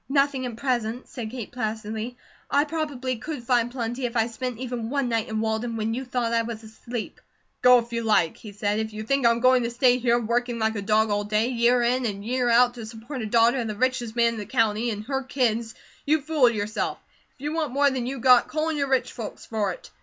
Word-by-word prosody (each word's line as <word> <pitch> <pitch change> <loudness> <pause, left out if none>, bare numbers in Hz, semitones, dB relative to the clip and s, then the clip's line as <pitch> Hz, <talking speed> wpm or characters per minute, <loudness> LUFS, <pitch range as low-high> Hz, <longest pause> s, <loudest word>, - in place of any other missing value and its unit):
"Nothing 275 -2 +1
at 235 - -6
present," 240 -1 -2
said 235 -4 -6
Kate 235 -2 -7
placidly. 220 0 -4 0.3
"I 285 - +3
probably 290 -5 -3
could 290 +1 -6
find 240 -1 +2
plenty, 240 0 -3
if 240 0 -4
I 225 - +3
spent 245 +1 -5
even 245 -2 -4
one 275 -2 0
night 230 -1 -1
in 220 0 -1
Walden 225 +1 -1
when 220 +1 -1
you 260 +3 -4
thought 245 -2 -1
I 230 - +3
was 230 -1 -6
asleep." 220 +1 -7 0.4
"Go 250 0 +8
if 235 0 -3
you 230 - -1
like," 210 -7 +2
he 215 - -11
said. 205 +1 -1
"If 220 0 -3
you 215 0 -5
think 275 +2 +2
I'm 235 0 +2
going 255 0 +5
to 235 - -1
stay 250 +1 +3
here, 240 -1 +3
working 240 +1 -1
like 220 0 0
a 205 - -2
dog 215 +1 +2
all 205 0 +1
day, 215 +3 +1
year 240 0 +3
in 245 +1 +1
and 200 -1 -5
year 250 +1 0
out, 240 +1 +5
to 235 -2 -8
support 235 +4 -7
a 220 - -3
daughter 235 +3 +4
of 235 - -2
the 215 - -4
richest 245 -1 -1
man 235 -1 +4
in - - -7
the 205 - -6
county 220 +1 +1
and 210 -2 -4
her 265 +3 -2
kids, 235 -4 -1 0.3
you 310 +2 +2
fool 295 -4 +3
yourself. 215 -1 -2 0.4
If - - -23
you 295 +2 -3
want 315 -5 -1
more 280 +1 +3
than 250 -2 -2
you 270 +1 -3
got, 250 0 +5
call 315 +1 -1
on 315 - -2
your 280 -1 -1
rich 265 -1 +1
folks 225 -4 -7
for 210 -3 -1
it. - - -11
235 Hz, 245 wpm, -25 LUFS, 220-255 Hz, 0.4 s, Go